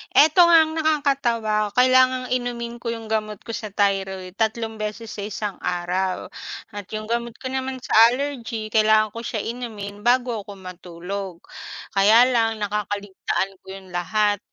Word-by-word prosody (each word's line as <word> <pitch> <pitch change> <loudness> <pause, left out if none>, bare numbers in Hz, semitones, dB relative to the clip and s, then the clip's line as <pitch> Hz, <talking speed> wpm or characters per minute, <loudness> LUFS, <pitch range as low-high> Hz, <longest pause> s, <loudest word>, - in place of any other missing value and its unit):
Eto 310 +4 +6
nga 335 -1 +7
ang 315 - -4
nakakatawa, 275 -9 +1
kailangang 255 0 +4
inumin 240 -1 -3
ko 235 - -8
yung 225 -1 -4
gamot 215 -2 -2
ko - - -7
sa 220 -1 -4
thyroid 190 -2 -1
3 225 0 -1
beses 215 +1 -5
sa - - -8
1 210 -1 -4
araw, 180 +1 -2 0.4
at 205 -2 -8
yung 215 +1 -5
gamot 235 0 -2
ko 260 +1 -6
naman 265 0 -2
sa - - -8 0.2
allergy, 240 -4 -3
kailangan 215 -1 +4
ko 230 - -7
siya 230 -2 -3
inumin 215 -3 -6
bago 240 -4 +1
ko 205 - -8
matulog, 180 0 -7 0.5
kaya 210 +4 +6
lang 225 -2 +2
nakakaligtaan 205 -2 -2
ko - - -46
'yun 190 -1 -10
lahat, 205 +3 +1
220 Hz, 155 wpm, -23 LUFS, 200-240 Hz, 0.5 s, nga